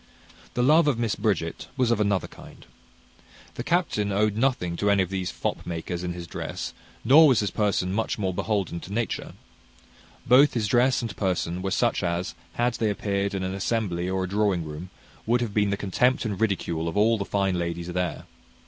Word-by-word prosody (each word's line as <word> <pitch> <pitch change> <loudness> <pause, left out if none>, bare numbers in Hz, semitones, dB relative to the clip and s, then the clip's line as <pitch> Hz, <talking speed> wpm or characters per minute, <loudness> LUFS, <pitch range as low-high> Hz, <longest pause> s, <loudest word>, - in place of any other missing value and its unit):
The 125 - +2
love 155 +4 +5
of 140 -5 +2
Miss 115 -3 0
Bridget 95 -6 -1
was 125 -3 +2
of 115 - +2
another 100 -2 +1
kind. - - -14 0.9
The 120 - -5
captain 155 - 0
owed 105 +1 +1
nothing 115 -8 0
to 100 - +1
any 100 -1 +4
of 90 - -7
these 95 -2 -2
fop - - -3
makers 85 +1 -4
in 90 -1 -2
his 85 -1 -7
dress, - - -5 0.3
nor 155 +4 +8
was 130 -6 +4
his 105 - -1
person 100 -3 0
much 110 +2 -1
more 95 -3 -1
beholden 95 -3 -1
to 90 - -10
nature. 115 -2 -2 0.9
Both 130 +4 +6
his 115 -3 +1
dress 125 +3 +3
and 115 - -4
person 90 -2 -1
were 95 - -2
such - - +1
as, 85 0 -2 0.2
had 120 0 +1
they 110 - +2
appeared 100 -1 -1
in 95 - -2
an 95 0 -2
assembly 95 -3 -1
or 95 0 -1
a - - -2
drawing 100 -3 +1
room, 75 +4 -7 0.4
would 120 +2 +3
have 115 -4 -2
been 105 -1 +2
the 100 - 0
contempt 125 +7 +1
and 105 -3 -3
ridicule 85 -6 0
of 85 - -3
all 110 +2 +3
the - - -1
fine 95 -2 0
ladies 85 0 -3
there. 90 -1 -2
100 Hz, 200 wpm, -25 LUFS, 90-115 Hz, 0.9 s, nor